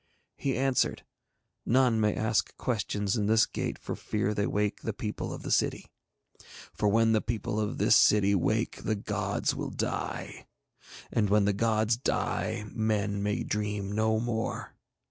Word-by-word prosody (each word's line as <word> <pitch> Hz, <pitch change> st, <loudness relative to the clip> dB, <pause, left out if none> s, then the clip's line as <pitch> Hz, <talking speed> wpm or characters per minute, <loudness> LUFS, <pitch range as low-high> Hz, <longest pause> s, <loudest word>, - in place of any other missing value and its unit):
He 135 Hz, -2 st, -1 dB
answered: 135 Hz, 0 st, +1 dB, 0.6 s
'None 120 Hz, -2 st, +3 dB
may 105 Hz, -1 st, +2 dB
ask 110 Hz, -5 st, 0 dB
questions 105 Hz, -4 st, -1 dB
in 105 Hz, -1 st, 0 dB
this 110 Hz, 0 st, +5 dB
gate -, -, -4 dB
for -, -, -5 dB
fear 105 Hz, -1 st, -1 dB
they 100 Hz, 0 st, 0 dB
wake 105 Hz, 0 st, -1 dB
the -, -, -3 dB
people -, -, -4 dB
of -, -, -7 dB
the -, -, -4 dB
city. -, -, 0 dB, 0.8 s
For 105 Hz, -, +1 dB
when 115 Hz, +2 st, +4 dB
the 110 Hz, -1 st, +3 dB
people 110 Hz, -1 st, -2 dB
of 105 Hz, -1 st, -2 dB
this -, -, +4 dB
city 100 Hz, -1 st, +5 dB
wake 110 Hz, +4 st, 0 dB
the 110 Hz, -, 0 dB
gods 100 Hz, -, -1 dB
will -, -, -4 dB
die. -, -, -4 dB, 0.6 s
And 105 Hz, -3 st, +1 dB
when 105 Hz, 0 st, +4 dB
the 100 Hz, -, +2 dB
gods 110 Hz, +1 st, +1 dB
die 110 Hz, -3 st, -1 dB
men 105 Hz, -2 st, 0 dB
may 105 Hz, +1 st, -1 dB
dream 105 Hz, -1 st, -2 dB
no 110 Hz, +1 st, +1 dB
more.' 115 Hz, -1 st, -3 dB
105 Hz, 160 wpm, -29 LUFS, 105-110 Hz, 0.8 s, this